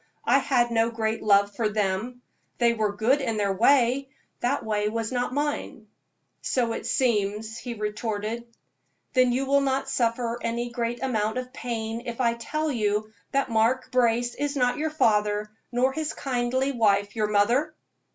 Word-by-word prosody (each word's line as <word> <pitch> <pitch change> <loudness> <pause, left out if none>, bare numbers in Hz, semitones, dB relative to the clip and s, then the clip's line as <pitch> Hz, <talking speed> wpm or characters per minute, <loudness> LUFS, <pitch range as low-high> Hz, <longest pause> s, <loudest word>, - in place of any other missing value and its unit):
I 275 - +5
had 245 -3 +1
no 225 0 +2
great 225 -1 -2
love 200 -1 +3
for 220 -1 0
them. 210 +4 -2 0.3
They 235 -1 +3
were 215 -3 -1
good 245 +7 +2
in 230 -5 -1
their 200 -2 +1
way 255 +4 +3 0.3
that 250 +1 -1
way 210 -1 0
was 225 +1 -3
not 245 -1 -1
mine." 285 -6 -3 0.5
"So 235 -3 0
it - - -5
seems," 220 -2 0
he 240 -2 -6
retorted. 215 +1 -3 0.7
"Then 255 -1 +4
you 260 +3 0
will 280 +1 +3
not 270 0 0
suffer 235 -1 0
any 235 +1 -2
great 240 +1 -3
amount 220 -3 0
of 255 0 -5
pain 225 -1 -4
if 235 +1 -5
I 235 -2 +3
tell 305 +6 -2
you 215 -3 -1 0.2
that 275 -2 0
Mark 235 +4 +1
Brace 240 -1 +2
is 290 0 -2
not 250 +1 +1
your 315 +1 0
father, 210 -7 +1 0.2
nor 255 +2 +2
his 315 0 -3
kindly 260 +1 0
wife 205 -4 +2
your 215 -1 +1
mother?" 240 +10 +2
235 Hz, 165 wpm, -26 LUFS, 215-255 Hz, 0.7 s, I